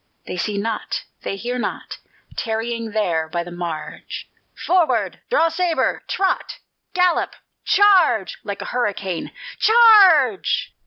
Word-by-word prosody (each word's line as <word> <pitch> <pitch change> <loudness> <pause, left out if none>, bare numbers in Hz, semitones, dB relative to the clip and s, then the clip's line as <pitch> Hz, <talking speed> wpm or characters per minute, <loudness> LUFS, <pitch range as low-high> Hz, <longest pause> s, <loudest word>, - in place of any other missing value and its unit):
They - - -5
see 200 +3 -2
not, 220 +1 -3 0.2
they - - -4
hear 245 +5 -4
not, - - -5 0.4
Tarrying 230 0 -3
there 175 -7 -1
by 170 +1 -2
the 175 - -10
marge: 175 -3 -6 0.4
Forward! 355 -2 +1
Draw 475 -10 +3
sabre! 335 0 0
Trot! 380 -1 -1 0.4
Gallop! 360 -1 +1 0.3
Charge! 385 - +3
like 200 -1 -5
a - - -7
hurricane, 200 -7 -2 0.3
_charge! 395 - +5
230 Hz, 115 wpm, -21 LUFS, -, 0.4 s, charge